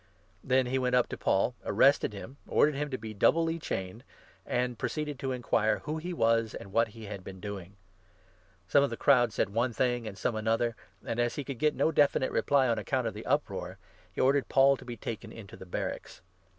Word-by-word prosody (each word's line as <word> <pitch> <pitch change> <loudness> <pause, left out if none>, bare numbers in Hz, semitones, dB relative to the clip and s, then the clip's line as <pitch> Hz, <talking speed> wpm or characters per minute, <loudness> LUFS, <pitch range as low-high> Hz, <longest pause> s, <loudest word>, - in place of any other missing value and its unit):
Then 130 0 +2
he 130 +2 0
went 125 -1 +1
up 125 - +3
to - - -4
Paul, 100 +6 +1
arrested 140 -5 +3
him, 110 +6 -9
33 - - -5
ordered 150 - +5
him 145 +1 -2
to 130 - -3
be 110 -1 -7
doubly 165 +9 +2
chained, 95 - -5 0.4
and 125 -1 -1
proceeded 150 -3 -3
to 135 - -2
inquire 110 -4 +1
who 155 +1 -3
he 175 +3 -5
was, 115 -7 +1
and 100 - -9
what 115 0 +3
he 110 0 -11
had 100 -2 -7
been 95 0 -9
doing. 100 -1 -7 0.9
Some 140 - +4
of 140 - +1
the - - -5
crowd 125 -4 +4
34 - - -13
said - - +1
one 120 +3 0
thing, 120 -1 0
and 100 -2 -7
some 110 +4 -1
another; 115 +1 0 0.3
and, 115 - -3
as 120 0 +1
he 145 - -3
could 135 -3 -6
get 150 -1 +2
no 160 - +2
defi 145 -2 +4
nite 130 - -1
reply 140 -2 +2
on 115 -2 +1
account 130 -3 -1
of 115 - -2
the 105 +2 -8
uproar, 95 -10 -1 0.3
he - - -8
ordered 135 +1 +2
Paul 135 0 +5
to - - -13
be 120 -1 -7
taken 115 - -6
into 105 -4 -11
the 95 - -12
barracks. - - -5
120 Hz, 225 wpm, -30 LUFS, 110-135 Hz, 0.9 s, ordered